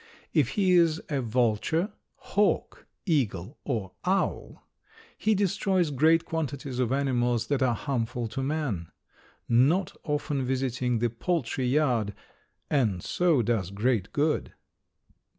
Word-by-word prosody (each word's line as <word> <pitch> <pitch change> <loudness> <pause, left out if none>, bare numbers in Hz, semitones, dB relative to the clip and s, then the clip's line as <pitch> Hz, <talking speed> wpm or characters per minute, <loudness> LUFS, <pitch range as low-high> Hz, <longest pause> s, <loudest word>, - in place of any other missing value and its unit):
If - - +3
he 190 -3 +3
is 165 -2 +4
a 140 -3 0
vulture, 125 - +1 0.2
hawk, - - -1 0.2
eagle 125 - -1
or 110 -9 -3
owl, 190 +2 -1 0.5
he 215 0 +1
destroys 190 -3 +1
great 160 +4 +3
quantities 140 -5 -3
of 125 -1 +1
animals 125 -4 +1
that 140 -2 +1
are 125 -3 +3
harmful 120 -2 -2
to 120 +5 -4
man, 135 - -2 0.6
not 140 +11 +3
often 145 -2 -1
visiting 130 -1 0
the 120 0 0
poultry 130 -1 -1
yard, 125 -7 +1 0.5
and 110 - +1
so 170 -8 +2
does 105 -5 0
great 105 0 0
good. 150 +1 0
130 Hz, 120 wpm, -27 LUFS, 120-155 Hz, 0.6 s, is